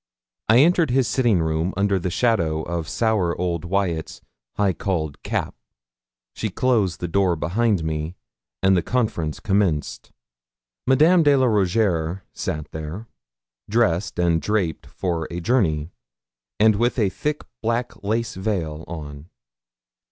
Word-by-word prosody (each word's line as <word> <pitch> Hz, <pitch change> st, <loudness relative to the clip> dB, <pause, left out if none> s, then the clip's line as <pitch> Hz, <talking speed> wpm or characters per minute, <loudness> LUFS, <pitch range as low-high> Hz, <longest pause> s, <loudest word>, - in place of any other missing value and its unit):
I 110 Hz, -, +7 dB
entered 170 Hz, -1 st, +4 dB
his 130 Hz, 0 st, +2 dB
sitting 115 Hz, -10 st, +2 dB
room 80 Hz, +3 st, -1 dB
under 100 Hz, -1 st, +2 dB
the 90 Hz, -, -2 dB
shadow 85 Hz, -7 st, +1 dB
of 85 Hz, -1 st, -4 dB
sour 105 Hz, -8 st, 0 dB
old 85 Hz, -2 st, -1 dB
Wyat's 85 Hz, -3 st, -1 dB, 0.4 s
high 100 Hz, -2 st, +2 dB
cauled 80 Hz, -8 st, -3 dB
cap; -, -, -2 dB, 0.8 s
she -, -, -3 dB
closed 110 Hz, -9 st, +1 dB
the 90 Hz, -, -3 dB
door 95 Hz, 0 st, +2 dB
behind 95 Hz, +4 st, 0 dB
me, 80 Hz, +2 st, -3 dB, 0.5 s
and 95 Hz, 0 st, +5 dB
the 90 Hz, -, +2 dB
conference 95 Hz, -12 st, -1 dB
commenced. 95 Hz, -7 st, 0 dB, 0.8 s
Madame 155 Hz, +7 st, +5 dB
de 145 Hz, -2 st, +5 dB
la 130 Hz, -1 st, +3 dB
Rougierre 95 Hz, -5 st, +1 dB
sat 75 Hz, -1 st, -4 dB
there, 80 Hz, +7 st, -6 dB, 0.6 s
dressed 100 Hz, -4 st, +1 dB
and 85 Hz, -2 st, +2 dB
draped 100 Hz, -7 st, -1 dB
for 85 Hz, -4 st, -3 dB
a 85 Hz, -, -4 dB
journey, 85 Hz, -, +1 dB, 0.7 s
and 110 Hz, -1 st, +5 dB
with 120 Hz, +4 st, +1 dB
a 105 Hz, -5 st, +2 dB
thick 150 Hz, +10 st, -3 dB, 0.2 s
black 115 Hz, -2 st, -2 dB
lace 110 Hz, +2 st, -1 dB
veil 90 Hz, -6 st, -3 dB
on. 75 Hz, -1 st, -8 dB
95 Hz, 135 wpm, -23 LUFS, 80-115 Hz, 0.8 s, I